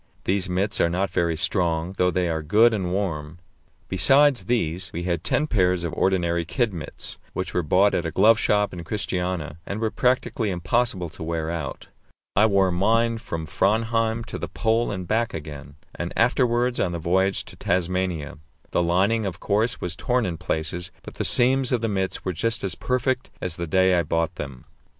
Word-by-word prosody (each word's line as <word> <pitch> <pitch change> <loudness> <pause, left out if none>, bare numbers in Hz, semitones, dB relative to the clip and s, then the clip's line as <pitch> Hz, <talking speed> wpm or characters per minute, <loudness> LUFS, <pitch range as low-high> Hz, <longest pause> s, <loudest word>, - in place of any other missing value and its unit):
These 95 0 0
mits 95 +3 0
are 85 - +3
not 90 +1 -1
very 85 -3 0
strong, 85 0 0
though 90 - +4
they 90 -1 0
are 80 -1 -1
good 110 +10 +4
and 95 -4 -2
warm. 85 -5 -3 0.5
Besides 135 - +4
these, 90 -6 -1
we 85 - -4
had 85 -2 -1
ten 150 - +1
pairs 90 - +1
of 85 - -3
ordinary 85 -3 +1
kid 100 +6 -1
mits, 80 -3 -6
which - - -4
were 90 - +1
bought 95 +6 +3
at 85 - 0
a 80 - -2
glove 110 +7 +5
shop 105 -3 +2
in 85 -1 -6
Christiania, 90 -4 -3
and 100 +4 -5
were 110 -1 0
practically 125 -3 0
impossible 95 0 0
to 80 - -14
wear 80 0 -2
out. 80 -5 -5 0.5
I 105 +2 +5
wore 95 -3 +3
mine 115 +5 +2
from 85 -8 -5
Framheim 115 +6 +1
to - - -6
the - - -4
Pole 115 +1 +1
and 95 -3 -5
back 115 +1 0
again, 75 -2 -8 0.2
and 85 +1 -4
afterwards 120 0 +2
on 90 - 0
the - - -2
voyage 95 +4 +1
to - - -12
Tasmania. 90 -4 -1 0.3
The - - +2
lining, 95 +6 +2
of 90 -2 -6
course, 110 +3 0
was 90 -1 -3
torn 125 +5 0
in 85 -2 -3
places, 85 +1 -3
but - - -9
the - - -3
seams 130 +1 +3
of 125 -3 +1
the 115 - 0
mits 95 -3 -2
were 95 - -1
just 115 +6 -1
as 95 - 0
perfect 130 0 -1
as 90 -3 -3
the 85 -1 -4
day 95 +3 +3
I 90 - +3
bought 85 0 -1
them. 70 -5 -8
95 Hz, 190 wpm, -24 LUFS, 85-110 Hz, 0.5 s, glove